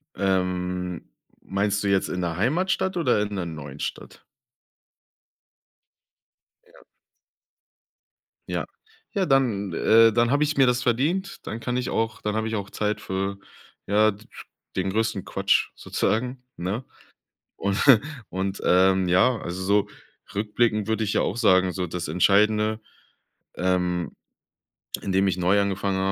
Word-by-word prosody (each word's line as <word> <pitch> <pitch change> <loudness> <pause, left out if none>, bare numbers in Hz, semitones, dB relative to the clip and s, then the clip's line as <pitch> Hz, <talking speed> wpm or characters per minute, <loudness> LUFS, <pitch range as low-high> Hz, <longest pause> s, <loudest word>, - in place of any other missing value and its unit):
Ähm, 90 -3 -1 0.3
meinst 100 +1 -1
du 100 - 0
jetzt 95 -1 +1
in 90 - -3
der 85 -1 -2
Heimatstadt 180 - 0
oder 125 -10 +2
in 105 0 -3
der 95 -3 -2
neuen 75 -4 -8
Stadt? - - -6 2.4
Ja. 465 +2 -20 1.7
Ja. - - -2 0.5
Ja, 195 -2 +2
dann 115 -8 +1
äh, 115 +6 +5
dann 120 +2 +2
habe 145 +2 +3
ich 150 -1 -1
mir 135 - +6
das 125 0 +2
verdient, 155 - 0
dann 115 - -5
kann 125 +1 -2
ich 125 - -2
auch 110 -1 -1
dann 105 0 -2
habe 110 0 -1
ich 110 - -2
auch 100 -1 -5
Zeit 105 0 -1
für, 95 +1 -3 0.5
ja, 105 +2 +4
d 105 +2 -14 0.5
den 95 +1 0
größten 110 -1 -1
Quatsch - - +1
sozusagen, 125 +3 -2
ne? 95 +8 -3 0.7
Und 100 0 -1 0.5
und, 95 +1 -3
ähm, 95 0 +4
ja, 95 +8 +4
also 90 +2 -5
so 100 +2 +2 0.4
rückblickend 105 0 0
würde 110 0 0
ich 105 - -1
ja - - +2
auch 105 - -2
sagen, 95 -5 +4
so 90 0 -2
das 90 0 -5
Entscheidende, 105 +3 +3 0.8
ähm, 90 -1 -1 0.9
in 100 - -3
dem 95 +1 +3
ich 95 -1 0
neu 90 +3 +3
angefangen 100 0 -1
100 Hz, 140 wpm, -25 LUFS, 95-115 Hz, 2.4 s, mir